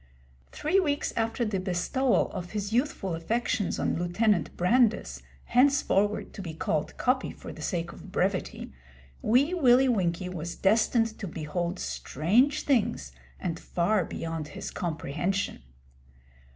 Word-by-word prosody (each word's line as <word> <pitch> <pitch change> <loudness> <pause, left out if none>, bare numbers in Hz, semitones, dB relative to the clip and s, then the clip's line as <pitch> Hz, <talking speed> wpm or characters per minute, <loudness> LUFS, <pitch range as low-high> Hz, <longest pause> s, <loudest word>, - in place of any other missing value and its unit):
Three 365 +6 +1
weeks 290 -5 0
after 230 +1 0
the 205 -3 -1
bestowal 195 +8 +1
of 175 +2 -6
his 205 0 -3
youthful 240 - 0
affections 210 +4 -1
on - - 0
Lieutenant 175 0 +1
Brandis 180 - +2 0.2
henceforward 245 -6 +2
to 200 - -7
be 165 -4 -6
called 155 -1 -2
'Coppy' 255 +1 +1
for - - -9
the - - -10
sake 170 -2 -2
of 185 - -12
brevity 185 - -1 0.5
Wee 270 +9 +3
Willie 265 -6 +5
Winkie 180 -5 0
was 170 -1 -5
destined 225 +2 +2
to 200 - -4
behold 170 +3 -3
strange 220 - +1
things 205 - +1 0.3
and 165 -2 -3
far 180 +3 +1
beyond 165 -2 -4
his 195 +5 -7
comprehension. 175 - -2
195 Hz, 130 wpm, -28 LUFS, 170-240 Hz, 0.5 s, Willie